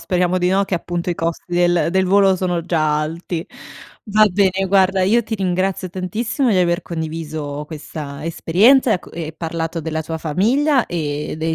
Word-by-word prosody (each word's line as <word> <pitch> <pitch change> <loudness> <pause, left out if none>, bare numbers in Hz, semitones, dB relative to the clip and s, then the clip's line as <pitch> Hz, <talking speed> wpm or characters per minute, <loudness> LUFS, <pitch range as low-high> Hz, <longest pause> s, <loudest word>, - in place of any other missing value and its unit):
speriamo 180 0 0
di 180 0 +1
no, 195 +1 +2
che, 190 - -2
appunto, 175 +1 -3
i 175 - 0
costi 165 0 -3
del 175 -1 +2
del 190 0 +2
volo 195 0 +4
sono 180 -2 -1
già 155 -3 +1
alti. 165 +2 -4 0.6
Va 215 +1 +5
bene, 195 0 +1
guarda, 190 0 +3
io 225 +6 +3
ti 220 0 -4
ringrazio 185 0 -1
tantissimo 215 - -1
di 200 - +2
aver 175 0 +2
condiviso 155 -3 -5
questa 150 -1 -7
esperienza 215 - +3
e - - +5
a - - -1
co - - -16
ehm, 160 -2 -5
parlato 165 0 -3
della 160 0 -3
tua 160 +1 -5
famiglia 245 - +1
e 150 -2 -3
dei 160 0 -1
175 Hz, 180 wpm, -19 LUFS, 160-195 Hz, 0.6 s, Va